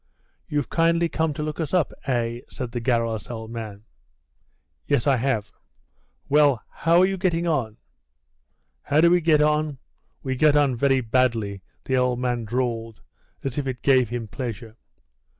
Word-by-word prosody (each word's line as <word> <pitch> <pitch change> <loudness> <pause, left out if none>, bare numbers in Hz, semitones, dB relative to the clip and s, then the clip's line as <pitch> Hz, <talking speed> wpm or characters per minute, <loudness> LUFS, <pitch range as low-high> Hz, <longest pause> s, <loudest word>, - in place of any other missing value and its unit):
"You've 145 -2 -2
kindly 170 0 +2
come 160 -1 0
to 150 - -3
look 155 +1 -4
us 160 +1 -1
up, 175 -5 +1
eh?" 120 -2 -1
said 125 -2 -6
the 120 - -3
garrulous 115 -3 -1
old 110 -2 -6
man. 110 -3 -7 1.0
"Yes, 120 - +1
I 140 -3 +3
have. 115 -4 -1 0.8
Well, 145 -5 +3
how 170 +2 +3
are - - +6
you 195 0 -1
getting 175 -2 0
on?" 130 -10 -1 1.0
"How 145 - +1
do 170 +1 +6
we 175 0 +4
get 155 -2 +4
on? 150 -1 +1 0.5
We 130 -1 -2
get 150 +2 +4
on 145 -3 +3
very 135 +1 +2
badly," 115 -5 0 0.2
the 130 - +1
old 125 -1 +1
man 120 -2 -1
drawled, 115 -1 -2 0.4
as 135 +1 -2
if 140 - -3
it 125 -2 -5
gave 130 -4 +4
him 120 -2 -4
pleasure. 115 -2 -6
130 Hz, 165 wpm, -24 LUFS, 115-150 Hz, 1.0 s, are